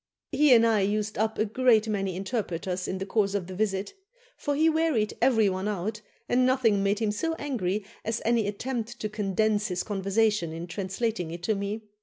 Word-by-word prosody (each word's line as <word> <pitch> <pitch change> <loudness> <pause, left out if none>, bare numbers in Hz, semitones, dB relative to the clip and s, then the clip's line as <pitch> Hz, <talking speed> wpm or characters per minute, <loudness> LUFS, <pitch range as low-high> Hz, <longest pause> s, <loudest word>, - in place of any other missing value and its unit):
He 295 0 +4
and 230 0 +5
I 220 -3 +3
used 210 +1 -1
up 220 0 0
a 215 - +2
great 225 0 +3
many 195 -4 -1
interpreters 185 -3 -3
in 190 - -2
the 190 - -4
course 200 -1 +1
of 195 -3 -1
the 185 - -8
visit; 195 - -1 0.4
for 290 -1 -2
he 315 +3 +3
wearied 315 -9 +1
every 230 -4 +4
one 190 +1 -1
out, 210 +1 -3 0.3
and 255 +1 +3
nothing 250 -6 +3
made 200 +1 +1
him 220 -1 0
so 325 +10 -2
angry 210 - -2 0.2
as 225 +1 -1
any 230 -2 +2
attempt 235 +2 -4
to 215 - -2
condense 210 0 0
his 180 -1 -2
conversation 200 -3 0
in 165 +1 -5
translating 190 +1 -3
it 170 +1 -7
to 220 - +1
me. 205 +2 -3
210 Hz, 195 wpm, -27 LUFS, 195-230 Hz, 0.4 s, and